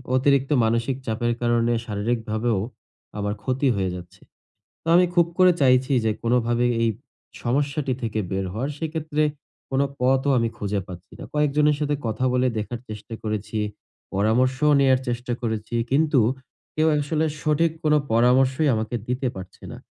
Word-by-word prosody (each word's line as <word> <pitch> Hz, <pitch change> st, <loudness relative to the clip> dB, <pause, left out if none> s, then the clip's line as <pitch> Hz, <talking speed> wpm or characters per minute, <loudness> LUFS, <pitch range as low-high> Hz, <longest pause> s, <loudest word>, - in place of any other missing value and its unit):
অতিরিক্ত 135 Hz, +1 st, +2 dB
মানসিক 115 Hz, +4 st, 0 dB
চাপের 120 Hz, +1 st, 0 dB
কারণে 120 Hz, 0 st, +2 dB
শারীরিকভাবেও 110 Hz, 0 st, -1 dB, 0.6 s
আমার 105 Hz, 0 st, -1 dB
ক্ষতি 135 Hz, +2 st, 0 dB
হয়ে 95 Hz, -2 st, -1 dB
যাচ্ছে। 90 Hz, -1 st, -11 dB, 0.6 s
তো -, -, -34 dB
আমি 180 Hz, +1 st, +6 dB
খুব 170 Hz, -2 st, +5 dB
করে 185 Hz, -1 st, +7 dB
চাইছি 130 Hz, 0 st, +4 dB
যে 110 Hz, -, +2 dB
কোন 115 Hz, -, 0 dB
ভাবে 120 Hz, +1 st, +2 dB, 0.2 s
এই 115 Hz, -, +3 dB, 0.5 s
সমস্যাটি 140 Hz, +2 st, 0 dB
থেকে 110 Hz, -2 st, -2 dB
বের 95 Hz, 0 st, -1 dB
হওয়ার 125 Hz, +8 st, -3 dB
সেক্ষেত্রে 155 Hz, -1 st, -2 dB, 0.5 s
কোন 135 Hz, 0 st, +1 dB, 0.2 s
পথও 130 Hz, +2 st, +2 dB
আমি 115 Hz, -1 st, +1 dB
খুঁজে 100 Hz, -1 st, -1 dB
পাচ্ছি 90 Hz, -1 st, -11 dB
না। -, -, -8 dB
কয়েকজনের 150 Hz, 0 st, +2 dB
সাথে 145 Hz, -1 st, 0 dB
কথা 110 Hz, +3 st, -2 dB
বলে 125 Hz, 0 st, +2 dB
দেখার 115 Hz, +3 st, -4 dB
চেষ্টা 110 Hz, +1 st, -7 dB
করেছি, 110 Hz, 0 st, -3 dB, 0.6 s
পরামর্শও 130 Hz, +8 st, +2 dB
নেয়ার 130 Hz, -2 st, +4 dB
চেষ্টা 120 Hz, 0 st, -2 dB
করেছি। 110 Hz, 0 st, -3 dB, 0.2 s
কিন্তু 145 Hz, 0 st, +3 dB, 0.5 s
কেউ 155 Hz, +1 st, +2 dB
আসলে 150 Hz, +2 st, 0 dB, 0.2 s
সঠিক 155 Hz, +2 st, +2 dB
কোন 150 Hz, -1 st, +4 dB, 0.2 s
পরামর্শই 130 Hz, +5 st, +3 dB
আমাকে 110 Hz, +2 st, -3 dB
দিতে 125 Hz, +1 st, -1 dB
পারছে 95 Hz, 0 st, -10 dB
না। -, -, -9 dB
125 Hz, 150 wpm, -23 LUFS, 110-145 Hz, 0.6 s, করে